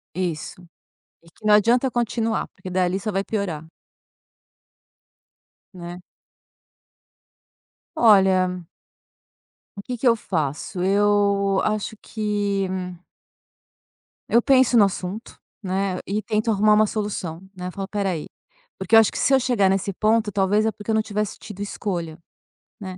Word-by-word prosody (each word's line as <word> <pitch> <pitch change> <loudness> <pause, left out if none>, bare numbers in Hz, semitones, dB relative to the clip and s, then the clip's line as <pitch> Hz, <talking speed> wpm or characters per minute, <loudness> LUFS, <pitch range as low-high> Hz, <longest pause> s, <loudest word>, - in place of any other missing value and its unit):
Isso. 175 -1 -4 0.6
E 170 - -20
que 215 - -25
não 210 - +6
adianta 240 +5 +3
continuar, 230 -2 -1
porque 185 -1 -11
dali 185 +1 0
só 215 - -3
vai 195 0 -1
piorar. 170 -8 -4 2.1
Né? 175 0 -8 1.9
Olha 190 - +4 1.1
o 200 - -7
que 245 +4 -5
que 245 - -3
eu 235 - +6
faço? 165 -1 -3
Eu 200 0 +2
acho 215 0 -2
que 205 -3 -2 1.6
eu 235 - +4
penso 260 -2 +4
no 210 - +7
assunto, 195 +3 -5 0.2
né, 190 0 -1
e 210 +2 -2
tento 215 +3 -1
arrumar 210 0 +4
uma 215 0 +4
solução, 200 -6 -4 0.2
né. 180 0 -5
Falo: 195 +1 -5
"Espera 200 -2 -2
aí". 160 -4 -4 0.5
Porque - - -1
eu - - +10
acho 220 - +2
que - - -5
se 275 - +2
eu 265 - +4
chegar 235 -6 +2
nesse 195 +1 0
ponto, 215 +2 +1
talvez, 205 +2 +2
é 220 - +1
porque 210 +2 -7
eu - - +2
não 220 - +2
tivesse 210 -1 -3
tido 205 -3 -10
escolha, 170 -6 -4 0.6
né. 185 -2 -7
200 Hz, 140 wpm, -23 LUFS, 185-215 Hz, 2.1 s, eu